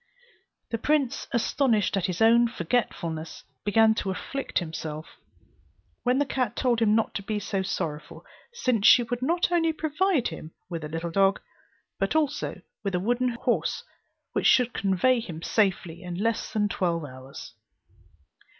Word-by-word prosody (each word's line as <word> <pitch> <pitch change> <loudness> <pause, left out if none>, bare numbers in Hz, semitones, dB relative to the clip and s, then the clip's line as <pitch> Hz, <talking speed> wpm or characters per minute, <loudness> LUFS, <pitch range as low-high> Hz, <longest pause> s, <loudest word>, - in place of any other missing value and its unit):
The 230 - -1
prince, 285 -1 0
astonished 235 -3 +1
at 195 -1 0
his 180 +3 0
own 235 +1 +6
forgetfulness, 170 -6 -2 0.2
began 220 +2 +4
to 205 - -3
afflict 270 +8 -4
himself; 155 -2 -4 0.8
when 250 +1 +2
the 285 - +2
cat 250 -4 -1
told 240 -3 +1
him 215 -1 +4
not 225 - +1
to - - -3
be 210 +2 -3
so 195 -1 -2
sorrowful, 155 -5 -4 0.3
since 250 - +1
she 245 - +8
would 240 +1 -4
not 345 +6 +1
only 330 -2 +3
provide 315 -1 0
him 160 -1 -9 0.2
with 165 -2 -4
a 150 - -5
little 165 +2 -4
dog, 195 +2 +3 0.6
but - - 0
also 295 -2 -1 0.2
with 195 -3 -1
a - - +1
wooden 245 +6 +1
horse - - -1 0.5
which - - +2
should 245 -2 +4
convey 200 +6 +2
him 165 -8 -7
safely 185 -5 0
in 180 -1 -6
less 225 +5 -1
than 210 -1 +1
twelve 170 -5 -1
hours. 130 0 -10
215 Hz, 155 wpm, -26 LUFS, 175-250 Hz, 0.8 s, she